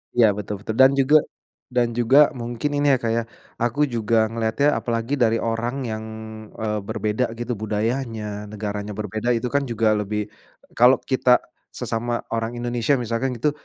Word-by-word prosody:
Ya, 115 -3 +6
betul 100 0 -5
betul 110 - -3
dan 135 +1 +7
juga 140 +3 +5 0.5
dan 120 -2 +1
juga 130 +6 +5
mungkin 120 +1 -3
ini 145 -1 +4
ya, - - 0
Kak, 115 - 0
ya, 115 +1 +1 0.4
aku 120 +5 +1
juga 110 -1 +1
ngelihatnya 115 +6 +1
apalagi 115 +4 -2
dari 115 -2 +3
orang 115 +4 -2
yang, 110 -2 -4 0.5
eee, 105 -1 -2
berbeda 110 +3 -1
gitu 120 -1 -4
budayanya, 110 -1 -3
negaranya 105 0 -5
berbeda 110 +3 -1
itu 115 +1 -2
kan 140 0 0
juga 115 -2 +1
lebih 105 0 -2 0.4
kalau 125 +3 +6
kita 130 -2 +2 0.2
sesama 120 0 -3
orang 115 +1 -2
Indonesia 120 +3 0
misalkan 125 +1 -2
gitu, 145 +6 +1
115 Hz, 160 wpm, -23 LUFS, 110-125 Hz, 0.5 s, dan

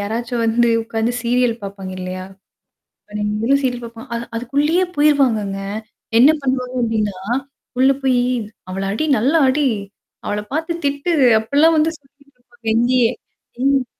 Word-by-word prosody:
யாராச்சும் 230 +3 -2
வந்து 235 +1 +3
உக்காந்து 225 +1 -1
சீரியல் 245 0 +2
பாப்பாங்க, 195 -1 -7
இல்லையா? 185 0 -5 0.9
அ - - -21
நம்மளும் 215 +7 +1
சீரியில் 245 -2 -1
பாப்போம். 230 0 -11
அ - - -1 0.2
அதுக்குள்ளேயே 295 +9 +1
போயிருவாங்கங்க. 250 -10 +2 0.6
என்ன 270 - +8
பண்ணுவாங்க 255 -1 -2
அப்டின்னா, 215 -4 -1 0.6
உள்ள 265 +1 +5
போய் 255 -2 +3 0.5
அவள 195 +1 -3
அடி 310 +9 -1
நல்ல 255 +8 +1 0.2
அடி. 285 +1 +2 0.6
அவள 205 - -1
பார்த்து 330 +2 -2
திட்டு. 285 +5 0 0.3
அப்படிலாம் 295 +8 +3
வந்து 315 +1 +3
சொல்லு 270 -4 -28
எங்கயே 240 0 +3 0.5
ம். 275 -2 +2
245 Hz, 130 wpm, -19 LUFS, 225-280 Hz, 0.9 s, என்ன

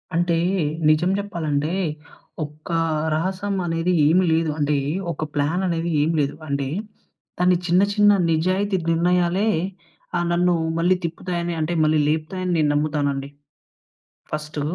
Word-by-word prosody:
అంటే 170 0 +2 0.5
నిజం 165 +4 +3
చెప్పాలంటే 160 -6 -2 0.7
ఒక 150 +3 -9 0.4
రహస్యం 190 +4 -2
అనేది 165 +1 0 0.2
ఏమి 180 +4 +4
లేదు. 160 0 +1
అంటే 145 0 +1 0.4
ఒక 160 - -4
ప్లాన్ 145 +5 +1
అనేది 170 -1 -1
ఏమి 160 +3 +1
లేదు. 140 - -1
అంటే 140 -1 -1 0.7
దాన్ని 180 0 +4
చిన్న, 175 +2 +4
చిన్న 205 0 +5 0.2
నిజాయితీ 185 +5 +1
నిర్ణయాలే 180 +4 +2 0.7
ఆహ్, 175 - 0
నన్ను 175 +1 +3 0.2
మళ్ళి 175 +3 +3
తిప్పుతాయని 170 +1 -3
అంటే 155 +2 -1
మళ్ళీ 155 0 +3
లేపుతాయి 155 +4 -2
అని 180 - 0
నేను 150 -2 +2
నమ్ముతాను 145 -1 0
అండి. 135 0 -5 1.0
ఫస్టు 150 0 -4
165 Hz, 130 wpm, -22 LUFS, 155-180 Hz, 1.0 s, చిన్న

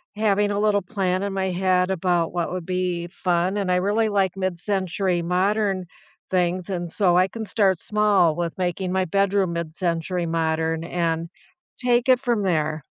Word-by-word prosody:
having 205 -1 +2
a 205 0 -1
little 210 -1 +2
plan 185 -2 -1
in 200 0 -2
my 190 -1 -1
head 185 0 +1
about 175 -2 0
what 175 -2 -2
would 180 -2 -4
be 180 -1 -2
fun. 180 +1 -1
And 195 -3 -1
I - - +3
really 205 +4 +1
like 195 -3 +1
mid-century 185 -1 -1
modern 190 +2 0 0.5
things, 180 +1 0
and 175 -2 -3
so 180 0 +2
I 185 +1 +4
can 220 +3 -6
start 195 -3 +2
small 205 -4 +2
with 170 -1 -3
making 180 0 -2
my 190 0 +1
bedroom 195 0 +1
mid-century 170 +1 -2
modern 160 0 -1
and 165 -1 -2 0.5
take 245 0 +2
it 255 -1 +6
from 240 -4 0
there. 155 -5 0
185 Hz, 165 wpm, -23 LUFS, 175-200 Hz, 0.5 s, it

